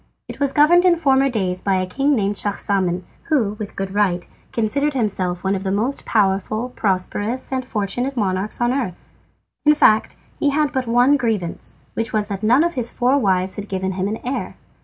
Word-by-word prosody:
It -, -, -9 dB
was 280 Hz, -1 st, +1 dB
governed 325 Hz, +5 st, +5 dB
in 360 Hz, -2 st, +5 dB
former 275 Hz, -4 st, +3 dB
days 185 Hz, -6 st, -1 dB
by 195 Hz, -1 st, +1 dB
a 185 Hz, 0 st, 0 dB
king 275 Hz, +10 st, +1 dB
named 205 Hz, -3 st, 0 dB
Schahzaman, 195 Hz, -3 st, -1 dB, 0.2 s
who, 235 Hz, -10 st, +1 dB
with 210 Hz, -2 st, -6 dB
good 195 Hz, 0 st, -4 dB
right, 190 Hz, -4 st, +1 dB, 0.2 s
considered 280 Hz, +6 st, 0 dB
himself 185 Hz, -7 st, -1 dB
one 190 Hz, 0 st, +1 dB
of 195 Hz, -1 st, -2 dB
the 190 Hz, -, -1 dB
most 230 Hz, +8 st, -1 dB
peaceful, 215 Hz, +3 st, +1 dB
prosperous, 205 Hz, +3 st, -2 dB
and 260 Hz, -1 st, -1 dB
fortunate 245 Hz, +4 st, -3 dB
monarchs 195 Hz, -1 st, -1 dB
on 240 Hz, 0 st, +2 dB
the 265 Hz, -, 0 dB
earth. 195 Hz, -10 st, -2 dB, 0.7 s
In 300 Hz, 0 st, +5 dB
fact, 220 Hz, -7 st, +3 dB, 0.2 s
he 290 Hz, -, +2 dB
had 295 Hz, 0 st, +1 dB
but 260 Hz, -2 st, -2 dB
one 245 Hz, +5 st, +4 dB
grievance, 215 Hz, -9 st, -3 dB, 0.2 s
which 225 Hz, -, -3 dB
was 210 Hz, -1 st, 0 dB
that 200 Hz, -1 st, -4 dB
none 245 Hz, +7 st, +4 dB
of 345 Hz, 0 st, 0 dB
his 245 Hz, -3 st, -2 dB
four 255 Hz, +3 st, +2 dB
wives 190 Hz, -4 st, 0 dB
had 205 Hz, 0 st, -6 dB
given 190 Hz, 0 st, -2 dB
him 190 Hz, +1 st, -2 dB
an 215 Hz, +2 st, -2 dB
heir. 260 Hz, +2 st, -3 dB
215 Hz, 200 wpm, -20 LUFS, 195-265 Hz, 0.7 s, governed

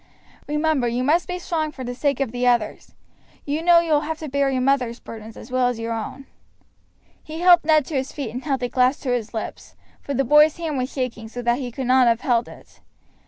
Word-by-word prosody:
Remember 300 Hz, -3 st, +1 dB
you 240 Hz, +2 st, -1 dB
must 320 Hz, +6 st, +2 dB
be 360 Hz, -, -3 dB
strong 320 Hz, -3 st, -2 dB
for 265 Hz, -, -8 dB
the 245 Hz, 0 st, -4 dB
sake 280 Hz, +3 st, -1 dB
of 270 Hz, -5 st, -1 dB
the 245 Hz, +1 st, -1 dB
others. 240 Hz, -3 st, 0 dB, 0.5 s
You 295 Hz, +2 st, -2 dB
know 345 Hz, 0 st, +6 dB
you 335 Hz, -1 st, -3 dB
will 295 Hz, -1 st, +4 dB
have 315 Hz, +1 st, -4 dB
to 315 Hz, -2 st, -7 dB
bear 280 Hz, 0 st, +1 dB
your 260 Hz, -1 st, 0 dB
mother's 255 Hz, -3 st, +1 dB
burdens 220 Hz, 0 st, -10 dB
as 250 Hz, -, -11 dB
well 255 Hz, -1 st, +2 dB
as 245 Hz, -2 st, -2 dB
your 230 Hz, 0 st, -3 dB
own." 225 Hz, +5 st, -6 dB, 1.0 s
He 315 Hz, +2 st, -8 dB
helped 350 Hz, -3 st, +6 dB
Ned 310 Hz, -3 st, +4 dB
to 315 Hz, -, -8 dB
his 270 Hz, 0 st, -2 dB
feet 275 Hz, -7 st, -5 dB
and 250 Hz, +3 st, -6 dB
held 275 Hz, -4 st, -1 dB
the 245 Hz, -, 0 dB
glass 255 Hz, +2 st, +2 dB
to 260 Hz, -, -2 dB
his 235 Hz, -3 st, -2 dB
lips, 220 Hz, -, -6 dB, 0.3 s
for 280 Hz, -, -4 dB
the 275 Hz, -, +2 dB
boy's 300 Hz, +4 st, +5 dB
hand 315 Hz, -5 st, -3 dB
was 255 Hz, +1 st, -3 dB
shaking 245 Hz, -4 st, -4 dB
so 245 Hz, +2 st, -7 dB
that 240 Hz, +2 st, +1 dB
he 250 Hz, -3 st, -5 dB
could 260 Hz, +2 st, -5 dB
not 255 Hz, 0 st, +4 dB
have 230 Hz, 0 st, +2 dB
held 245 Hz, -5 st, +1 dB
it. -, -, -16 dB
265 Hz, 240 wpm, -22 LUFS, 245-300 Hz, 1.0 s, know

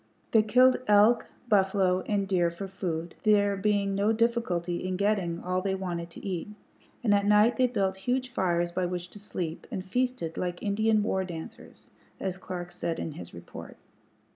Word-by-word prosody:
They 220 Hz, -, +6 dB
killed 250 Hz, +4 st, +5 dB
elk, 210 Hz, +3 st, +5 dB, 0.2 s
buffalo, 190 Hz, -3 st, +3 dB
and 200 Hz, -2 st, 0 dB
deer 180 Hz, -3 st, +2 dB
for 170 Hz, +4 st, -6 dB
food, 170 Hz, -3 st, -4 dB
there 205 Hz, -2 st, +3 dB
being 200 Hz, 0 st, +1 dB
no 200 Hz, +2 st, +2 dB
difficulty 220 Hz, -7 st, 0 dB
in 185 Hz, 0 st, -2 dB
getting 195 Hz, -4 st, 0 dB
all 185 Hz, +1 st, 0 dB
they 190 Hz, 0 st, -1 dB
wanted 175 Hz, -3 st, -4 dB
to 170 Hz, -, -11 dB
eat; 185 Hz, -4 st, -3 dB, 0.6 s
and 215 Hz, -4 st, +3 dB
at 200 Hz, 0 st, +2 dB
night 210 Hz, +3 st, +5 dB
they 255 Hz, -1 st, +4 dB
built 195 Hz, -6 st, -1 dB
huge 255 Hz, +5 st, -1 dB
fires 175 Hz, -6 st, 0 dB
by 180 Hz, 0 st, -1 dB
which 180 Hz, 0 st, -4 dB
to 205 Hz, -, -10 dB
sleep, 175 Hz, -5 st, -5 dB
and 185 Hz, -, -5 dB
feasted 250 Hz, -6 st, -1 dB
"like 175 Hz, -1 st, -3 dB
Indian 215 Hz, +1 st, +2 dB
war 190 Hz, -2 st, 0 dB
dancers," 170 Hz, -3 st, -9 dB, 0.3 s
as 190 Hz, -1 st, -3 dB
Clark 175 Hz, -1 st, -6 dB
said 170 Hz, -1 st, -3 dB
in 165 Hz, -, -4 dB
his 90 Hz, -, -9 dB
report. 85 Hz, 0 st, -10 dB
190 Hz, 175 wpm, -28 LUFS, 175-210 Hz, 0.6 s, They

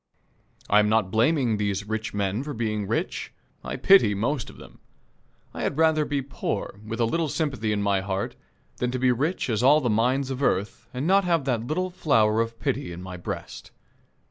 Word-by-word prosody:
I 105 Hz, -, +5 dB
am 105 Hz, 0 st, +3 dB
not 110 Hz, -4 st, +2 dB
blaming 120 Hz, 0 st, +2 dB
these 100 Hz, -1 st, -2 dB
rich 110 Hz, 0 st, -3 dB
men 100 Hz, +2 st, -1 dB
for 145 Hz, 0 st, -5 dB
being 105 Hz, -3 st, -2 dB
rich. -, -, -2 dB, 0.3 s
I -, -, -4 dB
pity 190 Hz, -, +5 dB
the -, -, -4 dB
most 125 Hz, +3 st, -1 dB
of -, -, -14 dB
them. -, -, -14 dB, 0.7 s
I -, -, -6 dB
had -, -, -1 dB
rather 160 Hz, -1 st, +3 dB
be 145 Hz, -2 st, -2 dB
poor, 130 Hz, -6 st, -4 dB
with 115 Hz, +2 st, -5 dB
a 115 Hz, -, +3 dB
little 160 Hz, +7 st, 0 dB
sympathy 135 Hz, -9 st, -1 dB
in 105 Hz, -1 st, 0 dB
my 100 Hz, -1 st, +2 dB
heart, 95 Hz, 0 st, -3 dB, 0.4 s
than 125 Hz, -, -1 dB
to 130 Hz, -, -2 dB
be 130 Hz, 0 st, +3 dB
rich 145 Hz, +9 st, -1 dB
as 110 Hz, -3 st, 0 dB
all 140 Hz, +4 st, +6 dB
the 125 Hz, -6 st, 0 dB
mines 130 Hz, +5 st, +1 dB
of 130 Hz, +1 st, -4 dB
earth 105 Hz, 0 st, -1 dB
and 130 Hz, +3 st, -4 dB
not 195 Hz, +3 st, +4 dB
have 165 Hz, -5 st, +1 dB
that 120 Hz, -3 st, -1 dB
little 185 Hz, +5 st, -1 dB
flower 115 Hz, -11 st, +2 dB
of 115 Hz, 0 st, -4 dB
pity 135 Hz, -6 st, -2 dB
in 85 Hz, +1 st, -8 dB
my 90 Hz, -1 st, -7 dB
breast. 90 Hz, -, -7 dB
120 Hz, 205 wpm, -25 LUFS, 105-145 Hz, 0.7 s, all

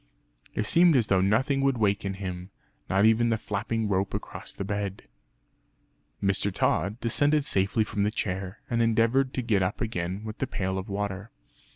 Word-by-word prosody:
It 105 Hz, -, 0 dB
seemed 170 Hz, +6 st, +5 dB
as 115 Hz, -5 st, +2 dB
though 95 Hz, -1 st, +4 dB
nothing 130 Hz, +8 st, +2 dB
would 135 Hz, -2 st, +2 dB
waken 100 Hz, -2 st, 0 dB
him 90 Hz, -1 st, -6 dB, 0.4 s
not 95 Hz, +2 st, +3 dB
even 115 Hz, +1 st, +4 dB
the 115 Hz, -, +1 dB
flapping 110 Hz, +2 st, -2 dB
rope 95 Hz, -1 st, 0 dB
across -, -, -7 dB
the -, -, -5 dB
bed. 100 Hz, -1 st, -3 dB, 1.2 s
Mr. 100 Hz, +1 st, +2 dB
Tod 100 Hz, +3 st, 0 dB
descended 145 Hz, +5 st, +2 dB
safely 100 Hz, -2 st, +1 dB
from 105 Hz, -1 st, -3 dB
the 105 Hz, -, +2 dB
chair, 95 Hz, -1 st, -4 dB
and 115 Hz, -2 st, 0 dB
endeavoured 115 Hz, +4 st, +2 dB
to 130 Hz, -, -1 dB
get 105 Hz, -4 st, +2 dB
up 95 Hz, +4 st, -1 dB
again 95 Hz, -3 st, -3 dB
with 110 Hz, 0 st, -7 dB
the 135 Hz, -, -1 dB
pail 95 Hz, -3 st, -2 dB
of 95 Hz, +3 st, -7 dB
water. 100 Hz, +1 st, -3 dB
105 Hz, 175 wpm, -27 LUFS, 95-115 Hz, 1.2 s, seemed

